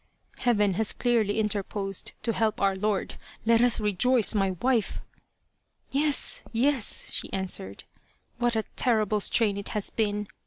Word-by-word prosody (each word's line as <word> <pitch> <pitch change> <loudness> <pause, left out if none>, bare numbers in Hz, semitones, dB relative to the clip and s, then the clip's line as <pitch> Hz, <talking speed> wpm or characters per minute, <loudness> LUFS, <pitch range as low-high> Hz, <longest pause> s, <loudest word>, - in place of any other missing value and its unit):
Heaven 210 -5 +2
has 215 +3 +1
clearly 225 -4 +1
interposed 200 -2 -2
to 230 - 0
help 220 -1 0
our 195 -1 +2
lord. 205 +1 -2 0.3
Let 230 0 +4
us 245 -1 +4
rejoice, 215 +2 +3
my 195 -2 +1
wife! 245 -4 0 0.3
" - - -48
" - - -39
Yes, 290 0 +1
yes," 245 0 -1
she - - -3
answered, 180 - -2 0.3
" - - -41
what 240 -1 +1
a 220 - +1
terrible 215 -4 +2
strain 205 0 +2
it 200 - -5
has 205 - -4
been 210 -2 -1
215 Hz, 155 wpm, -27 LUFS, 200-240 Hz, 0.3 s, Let